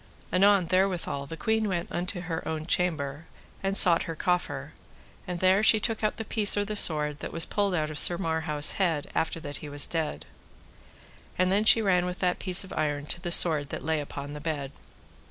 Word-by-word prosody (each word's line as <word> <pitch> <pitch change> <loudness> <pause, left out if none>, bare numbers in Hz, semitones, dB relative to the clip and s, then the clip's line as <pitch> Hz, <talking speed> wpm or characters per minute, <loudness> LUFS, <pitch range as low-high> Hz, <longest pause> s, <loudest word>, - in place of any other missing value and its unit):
Anon 195 0 +3
therewithal 180 -6 -1
the 165 - -8
queen 220 +6 -1
went 175 -3 -4
unto 180 +1 -4
her 165 -2 -5
own 155 -1 -4
chamber, 160 -4 -2 0.3
and 195 +1 0
sought 170 -3 +7
her 165 - -4
coffer, 150 -4 -3 0.5
and 180 -1 -5
there 185 +2 +3
she 220 0 +5
took 225 0 -3
out 215 - -1
the 225 - -6
piece 210 -1 +2
or 205 - 0
the 215 +1 -5
sword 150 -6 +1
that - - -7
was 165 0 0
pulled 200 -3 -1
out 155 -2 -2
of 150 - -1
Sir 175 - +4
Marhaus' 160 -4 +1
head 165 -6 -1
after 165 0 -2
that 145 -2 -7
he 150 - -10
was 145 0 +3
dead. 155 - -4 1.1
And 185 0 +1
then 205 +3 +1
she 225 0 +6
ran 180 -3 +1
with 180 0 -5
that 180 -1 -1
piece 185 -1 +3
of 190 - -10
iron 145 -2 -3
to 175 - -5
the 175 -1 -4
sword 155 -5 +5
that - - -7
lay 160 -1 -1
upon 145 0 -8
the 150 - -9
bed. 145 -4 -4
170 Hz, 210 wpm, -26 LUFS, 150-190 Hz, 1.1 s, sought